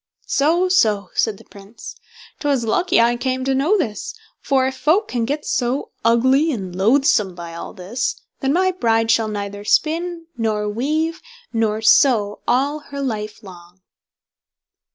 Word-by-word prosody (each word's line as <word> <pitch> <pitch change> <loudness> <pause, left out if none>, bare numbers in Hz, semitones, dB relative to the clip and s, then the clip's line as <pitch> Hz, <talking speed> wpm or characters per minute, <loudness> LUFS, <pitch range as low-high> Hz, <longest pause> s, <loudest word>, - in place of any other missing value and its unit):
"So! 330 +6 +2
so! 215 - +2
"said 220 -3 0
the - - -16
Prince, 200 +3 -12 0.4
"'twas 280 -5 0
lucky 350 +10 +2
I 235 +1 +4
came 260 +1 -2
to 270 - +1
know 300 +11 +2
this; 225 - -3 0.3
for 265 -2 +1
if 265 0 -2
folk 345 +11 +2
can 235 -2 -1
get 290 +4 -3
so 250 +2 -1
ugly 260 +7 +3
and 190 -8 -5
loathsome 210 -2 +2
by 170 -1 -8
all 170 - -7
this, 215 +6 -3 0.2
then 270 - 0
my 370 +4 +2
bride 225 -9 +1
shall 225 -1 +2
neither 205 -1 -5
spin, 330 +7 0
nor 215 -2 -1
weave, 305 +10 -1 0.3
nor 220 -1 0
sew 220 -4 +4
all 280 +4 +1
her 280 -1 -9
life 215 -7 -4
long." 180 -1 -14
240 Hz, 155 wpm, -20 LUFS, 210-290 Hz, 0.4 s, I